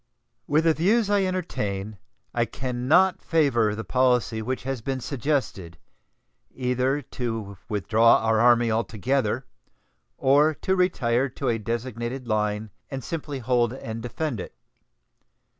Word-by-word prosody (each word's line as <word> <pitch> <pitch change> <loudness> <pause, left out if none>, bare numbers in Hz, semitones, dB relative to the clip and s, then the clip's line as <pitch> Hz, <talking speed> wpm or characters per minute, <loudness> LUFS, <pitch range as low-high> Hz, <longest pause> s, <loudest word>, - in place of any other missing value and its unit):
With 150 +2 +3
the 165 -1 +4
views 205 +6 +2
I 200 -2 +3
entertain 105 - -3 0.3
I 120 -1 +1
can 125 0 -4
not 185 +5 +4
favor 125 -10 +2
the 110 - -5
policy 125 -3 +1
which 130 +4 -3
has 135 -2 -3
been 135 +3 -2
suggested, 125 - -2 0.7
either 130 +2 -1
to 115 -6 -5
withdraw 110 +3 +4
our 110 0 +1
Army 120 0 +4
altogether 115 +2 -1 0.7
or 145 +4 +4
to 190 - 0
retire 135 -8 +1
to 130 +1 -3
a 115 -1 0
designated 120 +3 -4
line 105 -1 -1 0.2
and 135 -2 -5
simply 150 -2 -4
hold 120 -1 +1
and 115 -3 -6
defend 125 0 -3
it. - - -8
125 Hz, 130 wpm, -25 LUFS, 110-140 Hz, 0.7 s, the